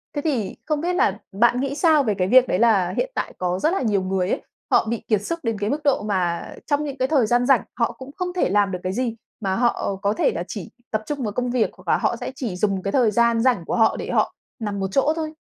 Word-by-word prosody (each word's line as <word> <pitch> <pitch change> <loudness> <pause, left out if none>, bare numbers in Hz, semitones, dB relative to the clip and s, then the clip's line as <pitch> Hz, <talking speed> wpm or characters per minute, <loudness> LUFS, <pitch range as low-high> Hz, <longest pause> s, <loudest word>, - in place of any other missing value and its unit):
Thế 290 - -1
thì 260 -10 -1
không 305 -2 -1
biết 350 +2 0
là 415 +4 +2
bạn 240 +5 +3
nghĩ 275 0 -2
sao 310 -2 +4
về 215 -5 +1
cái 180 - +1
việc 255 +4 +6
đấy 180 - 0
là 200 -6 +3
hiện - - 0
tại - - -3
có 180 0 -1
rất 315 - +2
là 390 - 0
nhiều 210 -6 +1
người 185 0 -1
ấy, - - -1 0.3
họ - - +4
bị 235 - 0
kiệt 215 -3 +2
sức 335 +10 -3
đến 225 -3 -1
cái 205 +1 -1
mức 300 +2 -2
độ 280 -6 +2
mà 185 -5 -1 0.2
trong 290 0 +1
những 285 -2 -5
cái 260 0 +1
thời 265 -6 +3
gian 245 +2 +2
rảnh, 265 -2 +5 0.2
họ 230 - +2
cũng 260 +1 -11
không 360 -1 -2
thể 360 - +1
làm 205 0 +2
được 180 - -3
cái 185 - -2
gì, 240 0 -1 0.2
mà 190 -3 -1
họ 235 -4 0
có 200 0 +1
thể - - +2
là 170 - -3
chỉ 200 -6 -6 0.2
tập 215 0 -1
trung 285 0 -3
vào 210 - -2
công 250 +3 -2
việc, 245 -3 +2
hoặc - - -19
là - - +4
họ - - 0
sẽ - - -5
chỉ 235 -9 -4
dùng 195 0 0
cái 195 - -1
thời 235 -4 +3
gian 235 +1 +3
rảnh 240 -9 +2
của - - -2
họ 225 -1 +3
để - - -5
họ - - +1 0.3
nằm 205 -3 -3
một 195 - -1
chỗ 280 +7 +3
thôi? 315 -1 -4
230 Hz, 285 wpm, -23 LUFS, 200-275 Hz, 0.3 s, việc